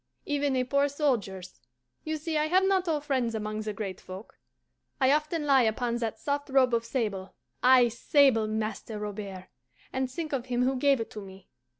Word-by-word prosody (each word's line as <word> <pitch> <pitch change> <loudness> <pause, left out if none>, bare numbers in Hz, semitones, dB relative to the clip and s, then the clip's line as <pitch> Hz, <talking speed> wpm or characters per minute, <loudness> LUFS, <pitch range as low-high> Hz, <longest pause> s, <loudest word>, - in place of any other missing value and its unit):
Even 285 -2 0
a 255 - +2
poor 280 +3 +1
soldier's. 215 - -2 0.4
You 315 0 -2
see 315 +1 -4
I 305 0 +2
have 370 +4 +3
not 380 -1 +2
all 310 -3 0
friends 260 -6 -1
among 215 0 -3
the 215 0 -3
great 195 -3 -6
folk. 185 +4 -11 0.6
I 265 -1 +4
often 305 +1 0
lie 275 -2 +5
upon 235 +1 0
that 230 -2 -3
soft 285 0 -3
robe 260 -2 +3
of 230 0 +2
sable 205 -8 -3 0.3
ay, 250 -1 +6
sable, 240 -1 +3
Master 215 0 -3
Robert 200 -3 -6 0.5
and 260 0 -1
think 310 +3 -5
of 260 -2 -2
him 245 0 0
who 265 +1 +1
gave 275 0 +3
it 225 - -5
to 210 - -7
me. 190 -1 -13
255 Hz, 190 wpm, -28 LUFS, 215-285 Hz, 0.6 s, ay